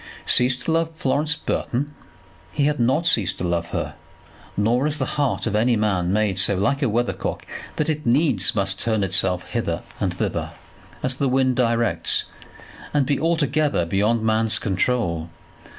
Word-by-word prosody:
Cease 125 Hz, 0 st, +3 dB
to 160 Hz, -, -3 dB
love 165 Hz, 0 st, 0 dB
Florence 150 Hz, +1 st, +1 dB
Burton! 145 Hz, 0 st, -2 dB, 0.6 s
He 140 Hz, -, +1 dB
had 150 Hz, -1 st, 0 dB
not 130 Hz, +8 st, +2 dB
ceased 110 Hz, -, +2 dB
to -, -, -4 dB
love 85 Hz, -1 st, -1 dB
her, -, -, -3 dB, 0.6 s
nor 120 Hz, +7 st, +2 dB
is 155 Hz, 0 st, +1 dB
the 135 Hz, -, -1 dB
heart 145 Hz, -4 st, 0 dB
of 110 Hz, -3 st, -1 dB
any 115 Hz, +3 st, +3 dB
man 95 Hz, -5 st, 0 dB
made 105 Hz, -2 st, +1 dB
so 100 Hz, 0 st, +3 dB
like 140 Hz, +9 st, +1 dB
a 135 Hz, -, +2 dB
weather 120 Hz, +3 st, 0 dB
cock -, -, -5 dB, 0.3 s
that 155 Hz, -, -1 dB
it 155 Hz, -1 st, -1 dB
needs 120 Hz, -, +2 dB
must 95 Hz, -1 st, 0 dB
turn 110 Hz, -3 st, +1 dB
itself 95 Hz, -1 st, 0 dB
hither -, -, -2 dB, 0.2 s
and -, -, 0 dB
thither, -, -, -3 dB, 0.5 s
as 130 Hz, 0 st, -1 dB
the 140 Hz, -1 st, +1 dB
wind 130 Hz, 0 st, +2 dB
directs, 115 Hz, -2 st, +1 dB, 0.7 s
and 145 Hz, -2 st, +3 dB
be 140 Hz, +1 st, 0 dB
altogether 155 Hz, -, +1 dB
beyond 105 Hz, +6 st, +1 dB
the -, -, -3 dB
man's 110 Hz, 0 st, +3 dB
control. 95 Hz, -5 st, -1 dB
120 Hz, 170 wpm, -22 LUFS, 100-140 Hz, 0.7 s, Cease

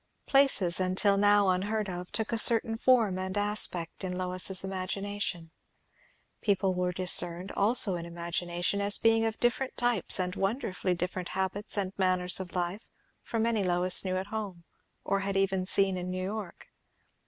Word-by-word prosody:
Places, 265 Hz, -11 st, +3 dB
until 185 Hz, +2 st, +1 dB
now 205 Hz, 0 st, +3 dB
unheard 205 Hz, +3 st, -1 dB
of, 180 Hz, -1 st, -7 dB
took 220 Hz, +2 st, -2 dB
a 230 Hz, -, +1 dB
certain 225 Hz, -1 st, +5 dB
form 225 Hz, -6 st, +2 dB
and 190 Hz, +1 st, -4 dB
aspect 205 Hz, -5 st, +1 dB
in 180 Hz, -1 st, -4 dB
Lois's 185 Hz, +1 st, 0 dB
imagination; 190 Hz, -2 st, -4 dB, 0.9 s
people 195 Hz, -2 st, 0 dB
were 180 Hz, 0 st, -1 dB
discerned, 180 Hz, 0 st, +1 dB
also 210 Hz, -1 st, +4 dB
in 170 Hz, -1 st, -4 dB
imagination, 175 Hz, +3 st, -3 dB
as 200 Hz, +1 st, +4 dB
being 225 Hz, 0 st, +3 dB
of 225 Hz, -1 st, -3 dB
different 255 Hz, +2 st, -1 dB
types 240 Hz, -6 st, +2 dB
and 180 Hz, 0 st, -2 dB
wonderfully 195 Hz, -3 st, -2 dB
different 180 Hz, +1 st, -5 dB
habits 190 Hz, +3 st, -2 dB
and 190 Hz, -2 st, -1 dB
manners 185 Hz, -1 st, +1 dB
of 185 Hz, -1 st, -8 dB
life 180 Hz, +4 st, -3 dB, 0.3 s
from 225 Hz, -1 st, -2 dB
any 230 Hz, -2 st, +1 dB
Lois 180 Hz, 0 st, +3 dB
knew 185 Hz, -1 st, -2 dB
at 190 Hz, -, -3 dB
home, 200 Hz, -6 st, -5 dB, 0.4 s
or 195 Hz, -, -1 dB
had 195 Hz, 0 st, -3 dB
even 190 Hz, -1 st, 0 dB
seen 195 Hz, -1 st, +2 dB
in 180 Hz, 0 st, -5 dB
New 185 Hz, 0 st, -4 dB
York. 200 Hz, -3 st, -7 dB
190 Hz, 160 wpm, -28 LUFS, 180-205 Hz, 0.9 s, certain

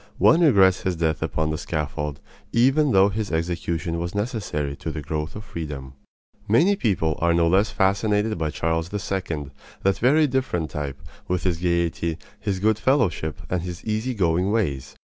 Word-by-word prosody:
One 165 Hz, -, +5 dB
regrets 95 Hz, -, +5 dB
his 95 Hz, -1 st, -1 dB
death 80 Hz, -2 st, 0 dB
upon 80 Hz, 0 st, -1 dB
the 80 Hz, -, -3 dB
scaffold, 75 Hz, -2 st, -3 dB, 0.3 s
even 135 Hz, +5 st, +4 dB
though 95 Hz, -1 st, +5 dB
his 105 Hz, 0 st, -3 dB
execution 85 Hz, 0 st, -2 dB
was 85 Hz, +3 st, -4 dB
necessary 100 Hz, -, -2 dB
to -, -, -5 dB
the 75 Hz, -1 st, -5 dB
growth 75 Hz, +1 st, -3 dB
of 105 Hz, -, -7 dB
freedom. 75 Hz, -7 st, -6 dB, 0.5 s
Many 165 Hz, -, +4 dB
people 90 Hz, -, 0 dB
are 85 Hz, 0 st, +3 dB
no 85 Hz, 0 st, +3 dB
less 95 Hz, +5 st, +3 dB
fascinated 105 Hz, +2 st, +1 dB
by 80 Hz, -1 st, 0 dB
Charles 80 Hz, +2 st, -1 dB
II., 90 Hz, -8 st, -3 dB, 0.3 s
that 95 Hz, 0 st, +2 dB
very 150 Hz, +6 st, +4 dB
different 130 Hz, -, -1 dB
type, 70 Hz, -2 st, -4 dB, 0.3 s
with 90 Hz, -3 st, -1 dB
his 90 Hz, -3 st, +1 dB
gaiety, 85 Hz, -2 st, 0 dB, 0.2 s
his 100 Hz, -2 st, -2 dB
good 105 Hz, +2 st, +2 dB
fellowship, 95 Hz, -, +1 dB
and 90 Hz, -1 st, -1 dB
his 90 Hz, 0 st, -7 dB
easy 110 Hz, +3 st, -1 dB
going 90 Hz, -1 st, +1 dB
ways. 70 Hz, -12 st, -1 dB
90 Hz, 165 wpm, -24 LUFS, 80-105 Hz, 0.5 s, One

